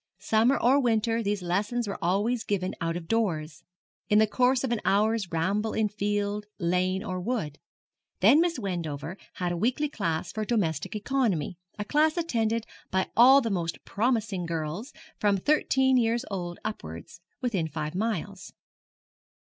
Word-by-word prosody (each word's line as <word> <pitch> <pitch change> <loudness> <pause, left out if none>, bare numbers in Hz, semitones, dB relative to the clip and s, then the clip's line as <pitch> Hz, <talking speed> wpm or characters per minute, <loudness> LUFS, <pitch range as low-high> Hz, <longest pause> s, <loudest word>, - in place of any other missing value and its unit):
Summer 220 +6 +3
or 265 +4 +4
winter 230 -1 +1
these 205 -3 -1
lessons 210 +7 -1
were 200 - -5
always 210 +7 +1
given 185 -2 -1
out 165 0 -1
of 165 -2 -8
doors, 165 -10 -1 0.5
in 210 - +5
the 220 - +6
course 250 +4 +2
of 260 - -1
an 235 - 0
hour's 210 -1 +1
ramble 195 +7 0
in 215 -1 +1
field, 205 0 -2
lane, 185 +1 0
or 185 0 -4
wood. 175 - -3 0.6
Then 245 - +6
Miss 345 -1 +1
Wendover 170 - -4 0.2
had 180 -1 -2
a 175 - -2
weekly 255 - 0
class 165 - -2
for 215 - -3
domestic 200 - -1
economy, 205 - -1 0.2
a 210 - -3
class 310 +6 +2
attended 230 -9 0 0.2
by 190 0 0
all 260 +4 +8
the 230 -4 -2
most 170 -3 -2
promising 215 -5 0
girls, 165 - -4 0.3
from 205 -1 +3
thirteen 265 +2 +3
years 235 +1 +1
old 175 -3 -4
upwards, 85 - -7 0.2
within 205 -11 -1
five 155 0 -4
miles. 200 -1 -3
210 Hz, 155 wpm, -27 LUFS, 175-235 Hz, 0.6 s, all